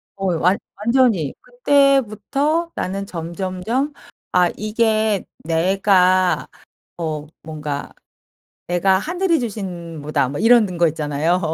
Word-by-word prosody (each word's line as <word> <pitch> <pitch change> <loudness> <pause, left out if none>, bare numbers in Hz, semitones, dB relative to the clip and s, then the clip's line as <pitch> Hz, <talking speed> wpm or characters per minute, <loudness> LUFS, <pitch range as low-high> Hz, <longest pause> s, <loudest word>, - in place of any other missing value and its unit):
어 195 -1 -3
완 180 +4 +3 0.2
완전히 220 - +2
그때부터 280 - +1
나는 195 +2 -3
점점점 185 - -3 0.4
'아 180 -1 +4
이게 215 -1 +1 0.2
내가 185 +2 +2 0.5
어 155 -3 -3 0.2
뭔가 150 -2 -5 0.8
내가 190 +2 +3
하늘이 345 - 0
주신 180 -8 -5
뭐다.' 145 -3 0
뭐 145 - -5
이러는 220 -6 +4
거 170 - +4
있잖아요. 155 +3 0
190 Hz, 210 characters per minute, -20 LUFS, 170-230 Hz, 0.8 s, 아